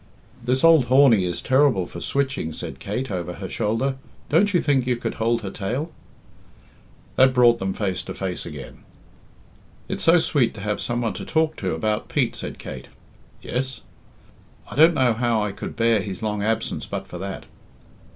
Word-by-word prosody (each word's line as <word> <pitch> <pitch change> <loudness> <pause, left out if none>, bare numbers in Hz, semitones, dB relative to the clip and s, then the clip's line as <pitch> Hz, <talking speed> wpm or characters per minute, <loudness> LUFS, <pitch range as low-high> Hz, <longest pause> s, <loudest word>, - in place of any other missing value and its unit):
"This 125 +2 +1
old 165 -5 +6
Horney 125 -7 +5
is 85 -1 -3
terrible 130 -8 +3
for - - -9
switching," 135 - -1
said - - -7
Kate, 115 +4 -4
over 90 -2 -3
her 95 +1 -6
shoulder. 115 +7 -1 0.3
"Don't 190 +7 +3
you 180 - +3
think 135 -5 +1
you 125 - +2
could 120 - -4
hold 115 0 +1
her 95 - -4
tail?" 125 +11 -3 1.3
That 130 0 +5
brought 120 -1 +5
them 95 0 -1
face 95 -4 -1
to - - -6
face 95 -2 -4
again. 75 -5 -9 1.1
"It's - - -4
so 165 +2 +6
sweet 140 -8 +1
to 105 - -8
have 105 0 -2
some 120 0 -2
one 115 -4 -1
to - - -6
talk 160 0 +1
to 95 -4 -2
about 105 +5 -2
Pete," - - 0
said - - -6
Kate. - - -8 0.6
"Yes?" 130 0 -3 0.9
"I - - -7
don't 160 +4 +6
know 125 -4 +3
how 115 -1 +1
I 105 - -2
could - - -7
bear 115 -1 +3
his 100 0 -6
long 105 -1 -1
absence 110 +2 -1
but - - -4
for 90 - -8
that." 95 +1 -6
115 Hz, 180 wpm, -23 LUFS, 100-135 Hz, 1.3 s, old